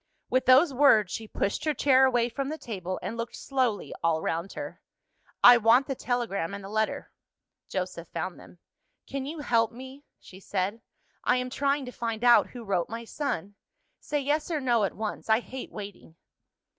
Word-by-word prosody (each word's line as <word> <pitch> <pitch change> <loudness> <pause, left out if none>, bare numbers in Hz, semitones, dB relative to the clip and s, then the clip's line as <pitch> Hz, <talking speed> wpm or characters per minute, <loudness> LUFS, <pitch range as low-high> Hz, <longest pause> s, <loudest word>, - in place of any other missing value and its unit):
With 255 0 +1
those 270 +4 +6
words, 225 -8 +5
she 225 - -5
pushed 200 - -2
her 305 -2 0
chair 265 0 +5
away 240 -2 +2
from 270 +3 -4
the 310 - -4
table, 185 - -5
and 195 +5 -4
looked 230 0 -5
slowly 255 -6 -1
all 165 -1 +2
round 165 +4 -3
her. 290 -1 -7 0.6
"I 245 0 +10
want 235 +4 +5
the 270 - -2
telegram 230 -8 -2
and 200 - -8
the 195 - -8
letter." 215 +1 -2 0.6
Joseph 180 -3 -4
found 170 +2 -5
them. - - -15 0.5
"Can 275 -1 -5
you 310 +1 -5
help 230 -5 +2
me?" 260 +3 -11 0.2
she 190 - -14
said. 195 +3 -2 0.4
"I - - +3
am 250 0 -3
trying 280 +1 0
to 250 - -7
find 230 -2 -4
out 240 -1 +6
who 245 -2 -9
wrote 190 -5 -1
my 230 +1 -6
son. 205 - -3 0.5
Say 295 -1 -2
yes, 295 +3 0
or 320 -3 0
no, 240 -5 +2
at - - -4
once; 215 +1 -5
I 220 +1 +5
hate 255 +1 -8
waiting." 200 -5 -9
235 Hz, 185 wpm, -27 LUFS, 200-265 Hz, 0.6 s, I